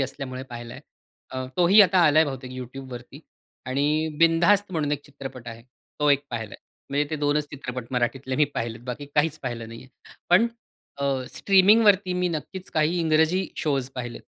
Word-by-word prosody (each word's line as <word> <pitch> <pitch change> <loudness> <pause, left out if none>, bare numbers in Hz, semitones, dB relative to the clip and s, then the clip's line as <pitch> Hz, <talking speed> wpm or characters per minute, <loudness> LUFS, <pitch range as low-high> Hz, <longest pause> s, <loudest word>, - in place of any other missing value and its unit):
असल्यामुळे 130 -1 -4
पाहिलाय. 120 0 -8 0.5
अ, 130 0 -4
तोही 180 +4 +6
आता 190 -1 +3
आलाय 155 +2 +5
बहुतेक 130 -2 -6
YouTubeवरती 130 +1 -9 0.5
आणि 140 +3 0 0.3
बिनधास्त 175 +4 +4
म्हणून 150 -3 -1
एक 145 -1 -3
चित्रपट 135 -4 -9
आहे. 115 0 -9 0.4
तो 150 - +3
एक 140 0 +2
पाहिलाय. 110 -3 -5 0.3
म्हणजे 145 +1 +1
ते 155 - -1
2 145 +1 +1
च - - -7
चित्रपट 125 -3 -6
मराठीतले 130 +1 -1
मी 150 - +5
पाहिलेत. 115 0 -4
बाकी 130 +3 -6
काहीच 155 +1 +1
पाहिलं 115 -3 -5
नाहीये. 115 +3 -11 0.4
पण 215 +7 +6 0.5
अ, 140 - -2 0.3
स्ट्रीमिंगवरती 200 -1 +4
मी 180 0 0
नक्कीच 175 +3 -6
काही 160 +3 +2
इंग्रजी 160 +3 +2
शोज 135 -4 -1
पाहिलेत. 120 -2 -6
145 Hz, 160 wpm, -25 LUFS, 130-165 Hz, 0.5 s, तोही